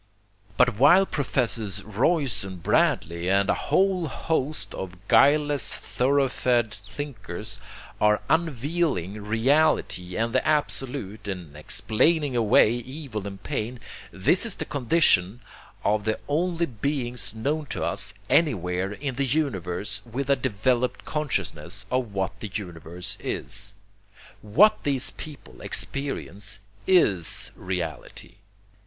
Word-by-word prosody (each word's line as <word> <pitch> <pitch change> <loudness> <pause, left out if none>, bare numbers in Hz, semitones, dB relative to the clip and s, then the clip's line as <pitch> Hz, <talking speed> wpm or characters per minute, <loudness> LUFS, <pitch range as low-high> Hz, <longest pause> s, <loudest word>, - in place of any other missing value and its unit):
But 125 -4 +3
while 175 +8 +7
Professors 115 - -1
Royce 120 - +1
and 95 -3 -8
Bradley 85 +2 +1
and 100 +1 +3
a - - -3
whole 185 -3 +2
host 145 - -2
of 90 -1 -6
guileless 145 +3 +4
thoroughfed 125 -4 +1
thinkers 105 -2 -6 0.4
are 105 0 +4
unveiling 145 - 0
Reality 115 - +1
and 115 +1 0
the - - +2
Absolute 135 -8 -1
and 90 -7 -6
explaining 140 - +1
away 110 -2 +5
evil 120 -3 -5
and 100 -1 -9
pain, 120 +3 -3 0.3
this 100 - +3
is 230 -4 +2
the 160 - -4
condition 125 - +2 0.4
of 105 0 +1
the 110 0 0
only 170 +3 0
beings 125 -2 -2
known 145 +7 -2
to - - -4
us - - 0
anywhere 95 - +1
in 130 +2 -4
the 140 -1 0
universe 105 - -1
with 130 +4 -3
a - - +6
developed 125 0 0
consciousness 95 - -3
of 125 -4 0
what 95 -1 -3
the 105 - -6
universe 90 -3 -6
is. 100 0 -3 0.7
What 170 - +4
these 135 -3 +2
people 135 - -11
experience 105 -8 -1 0.3
IS 105 - +3
Reality. 90 -4 -5
115 Hz, 115 wpm, -25 LUFS, 100-145 Hz, 0.7 s, while